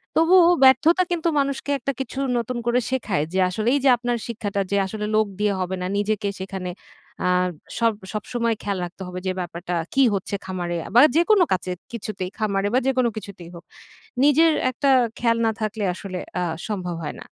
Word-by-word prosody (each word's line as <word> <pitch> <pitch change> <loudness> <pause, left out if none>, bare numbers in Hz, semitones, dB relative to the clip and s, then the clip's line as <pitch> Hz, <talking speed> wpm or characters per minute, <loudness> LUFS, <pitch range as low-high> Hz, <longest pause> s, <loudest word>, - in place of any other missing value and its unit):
তবুও 345 +1 +6
ব্যর্থতা 320 +7 +6
কিন্তু 340 -1 0
মানুষকে 275 0 -1
একটা 275 - -2
কিছু 265 0 -4 0.2
নতুন 240 +1 -2
করে 240 +1 +2
শেখায় 215 - 0
যে 190 - +1
আসলে 215 +5 -3
এই 285 - +2
যে - - +7
আপনার 240 0 -1
শিক্ষাটা 205 -4 -3
যে 200 - +2
আসলে 210 +2 -4
লোক 215 0 +4
দিয়ে 210 -1 +2
হবে 185 +1 -2
না - - -2
নিজেকে 205 0 -1
সেখানে 190 -1 -5 0.6
আ 180 - +2 0.5
সব 230 -1 +3 0.2
সবসময় 230 +2 -1
খেয়াল 200 -1 -2
রাখতে 175 +2 -12
হবে 180 0 -6
যে 185 - +1
ব্যাপারটা 175 0 -4 0.2
কী 275 - +4
হচ্ছে 200 +1 -2
খামারে 175 -2 -3 0.2
বা 245 - +9
যেকোনো 355 +3 +5
কাজে 180 0 -1 0.2
কিছুতেই 195 -4 -4
খামারে 200 -2 0
বা 255 - +4
যেকোনো 255 -3 +2
কিছুতেই 185 -5 -9
হোক। 170 - -11 0.6
নিজের 315 +3 +5 0.2
একটা 275 +3 0 0.3
খেয়াল 230 -1 +2
না 225 - +3
থাকলে 215 0 -2
আসলে 185 -1 -6 0.2
আ - - +1 0.2
সম্ভব 180 -5 -3
হয় 150 - -5
না। - - -10
215 Hz, 185 wpm, -23 LUFS, 190-255 Hz, 0.6 s, বা